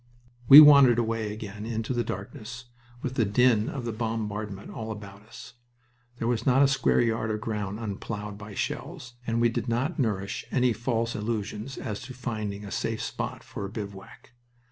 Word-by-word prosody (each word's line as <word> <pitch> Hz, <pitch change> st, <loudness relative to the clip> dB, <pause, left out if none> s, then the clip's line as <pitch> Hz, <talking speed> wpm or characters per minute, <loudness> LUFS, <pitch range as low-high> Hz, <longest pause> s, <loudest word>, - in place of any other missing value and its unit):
We 140 Hz, +4 st, +13 dB
wandered 140 Hz, -5 st, +8 dB
away 115 Hz, -2 st, -1 dB
again 105 Hz, -1 st, -7 dB
into 115 Hz, +2 st, -3 dB
the 120 Hz, -1 st, 0 dB
darkness, 120 Hz, +6 st, -7 dB, 0.4 s
with 130 Hz, -, -2 dB
the 125 Hz, -, +2 dB
din 110 Hz, +1 st, +3 dB
of 130 Hz, -4 st, -5 dB
the 115 Hz, -, -2 dB
bombardment 105 Hz, -3 st, -4 dB
all 110 Hz, -1 st, -6 dB
about 100 Hz, -2 st, -9 dB
us. 115 Hz, -, -12 dB, 0.6 s
There 115 Hz, -, -2 dB
was 120 Hz, -2 st, 0 dB
not 135 Hz, +2 st, +4 dB
a -, -, +6 dB
square 135 Hz, -3 st, +2 dB
yard 115 Hz, -2 st, 0 dB
of 105 Hz, 0 st, -1 dB
ground 105 Hz, -2 st, -4 dB
unplowed 105 Hz, -1 st, -5 dB
by 105 Hz, 0 st, -10 dB
shells 120 Hz, +4 st, -4 dB
and 115 Hz, 0 st, 0 dB
we 120 Hz, 0 st, +4 dB
did 115 Hz, +1 st, -3 dB
not 130 Hz, +9 st, -1 dB
nourish 105 Hz, -4 st, -1 dB
any 125 Hz, -2 st, +2 dB
false 115 Hz, 0 st, -1 dB
illusions 110 Hz, +3 st, -4 dB
as 105 Hz, -2 st, -5 dB
to 130 Hz, +1 st, -9 dB
finding 110 Hz, -4 st, -4 dB
a 100 Hz, -, -8 dB
safe 115 Hz, -1 st, -2 dB
spot -, -, -4 dB
for -, -, -7 dB
a 100 Hz, -, -4 dB
bivouac. 100 Hz, +1 st, -9 dB
115 Hz, 180 wpm, -27 LUFS, 105-120 Hz, 0.6 s, We